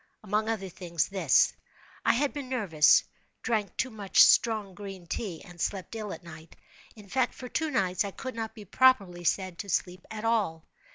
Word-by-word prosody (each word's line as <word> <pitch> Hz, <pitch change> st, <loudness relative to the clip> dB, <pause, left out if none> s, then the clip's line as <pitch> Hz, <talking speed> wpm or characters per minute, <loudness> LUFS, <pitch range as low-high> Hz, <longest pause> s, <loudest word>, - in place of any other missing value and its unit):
Among 215 Hz, +2 st, 0 dB
other 200 Hz, -4 st, -2 dB
things, 170 Hz, -2 st, -2 dB
this: 185 Hz, -8 st, +3 dB, 0.5 s
I -, -, +4 dB
had 280 Hz, +3 st, 0 dB
been 280 Hz, -3 st, -6 dB
nervous—drank 210 Hz, +1 st, +1 dB
too 260 Hz, -, -1 dB
much 205 Hz, -3 st, +5 dB
strong 215 Hz, -4 st, +3 dB
green 195 Hz, -2 st, -9 dB
tea, 175 Hz, -1 st, -5 dB
and 175 Hz, -2 st, -11 dB
slept 195 Hz, +1 st, -3 dB
ill 215 Hz, -3 st, -5 dB
at -, -, -8 dB
night—in 170 Hz, +5 st, -15 dB
fact, 250 Hz, +4 st, 0 dB
for 255 Hz, -, -8 dB
two 315 Hz, +5 st, -1 dB
nights 190 Hz, -, +1 dB
I 200 Hz, -, -3 dB
could 260 Hz, +6 st, -7 dB
not 225 Hz, -1 st, -5 dB
be 210 Hz, -2 st, -10 dB
properly 195 Hz, -7 st, +3 dB
said 185 Hz, 0 st, -1 dB
to 200 Hz, -, -6 dB
sleep 180 Hz, 0 st, -1 dB
at 220 Hz, 0 st, -6 dB
all. 200 Hz, -9 st, 0 dB
200 Hz, 175 wpm, -28 LUFS, 180-225 Hz, 0.5 s, much